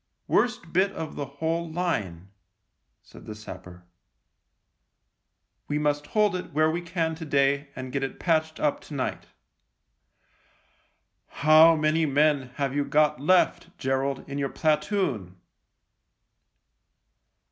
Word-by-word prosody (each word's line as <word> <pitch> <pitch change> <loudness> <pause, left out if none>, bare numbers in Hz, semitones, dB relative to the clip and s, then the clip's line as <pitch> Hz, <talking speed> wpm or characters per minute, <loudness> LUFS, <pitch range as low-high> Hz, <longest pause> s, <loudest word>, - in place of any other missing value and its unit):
" - - -51
Worst 240 -9 0
bit 190 +3 +3
of 160 -1 -6
the 145 - -4
whole 165 +2 -2
line," 100 - -3 0.7
said - - -15
the 110 - -6
sapper. 90 -4 -11 0.5
" - - -50
We 145 - 0
must 145 -1 0
hold 210 -3 +2
it 180 - -6
where 155 +1 +3
we 170 +2 -2
can 170 -2 -2
to 160 +1 -8
day 140 -1 +1
and 130 -1 -6
get 140 - -2
it 135 - -4
patched 160 -2 0
up 150 - 0
to 150 - -10
night." 130 - -3 0.7
" - - -20
How 155 +2 +7
many 155 +1 +1
men 145 -2 +2
have 140 -2 -2
you 145 - +1
got 150 -2 +2
left, 185 +5 +2
Gerald, 135 +1 -2
in 140 0 -5
your 140 -1 -1
platoon 150 - -1
150 Hz, 135 wpm, -26 LUFS, 135-165 Hz, 0.7 s, How